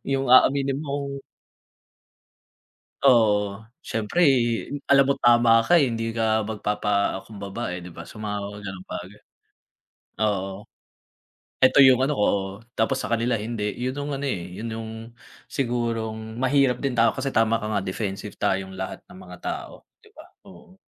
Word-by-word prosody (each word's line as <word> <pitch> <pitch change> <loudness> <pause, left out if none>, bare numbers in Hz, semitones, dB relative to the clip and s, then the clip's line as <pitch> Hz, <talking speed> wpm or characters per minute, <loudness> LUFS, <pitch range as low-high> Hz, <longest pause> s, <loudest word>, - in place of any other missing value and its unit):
Yung 135 0 0
aaminin 135 +1 +4
mong 140 -1 -4 1.8
Oo, 105 -5 +3 0.2
siyempre 110 +10 -2 0.7
alam 140 -1 +6
mo 140 - +2
tama 120 -1 +5
ka, 175 +4 +5
eh, 140 - +3
hindi 115 -1 -2
ka 110 -1 +1
magpapakumbaba, 105 -1 -2
eh, 90 - -4
di 90 - -10
ba, 85 - -8
sa 105 - -12
mga 105 -1 -4
ganung 95 -2 -8
bagay. 95 +4 -8 1.0
Oo. 95 -1 -2 1.0
'Eto 130 - +6
yung 130 -2 +7
ano 145 +3 +1
ko, 105 - +3
oh, 95 -1 0 0.2
tapos 110 - +1
sa - - -3
kanila 115 0 +1
hindi. 105 -1 -3
Yun 130 +2 -2
yung 145 0 -4
ano, 140 - -3
eh, 90 -5 -4
yun 110 0 -4
yung 110 0 -6 0.6
sigurong 115 -3 -3
mahirap 130 0 +2
din 130 -4 -2
tao 115 -1 +4
kasi 135 +1 -2
tama 115 -2 +2
ka - - -3
nga 105 - 0
defensive 100 +1 -4
tayong 95 0 -1
lahat 95 0 -5
ng 180 +1 -14
mga - - -11
tao, - - -6 0.2
di 430 - -20
ba, 315 -4 -14 0.2
oo. 185 - -16
115 Hz, 150 wpm, -24 LUFS, 105-130 Hz, 1.8 s, yung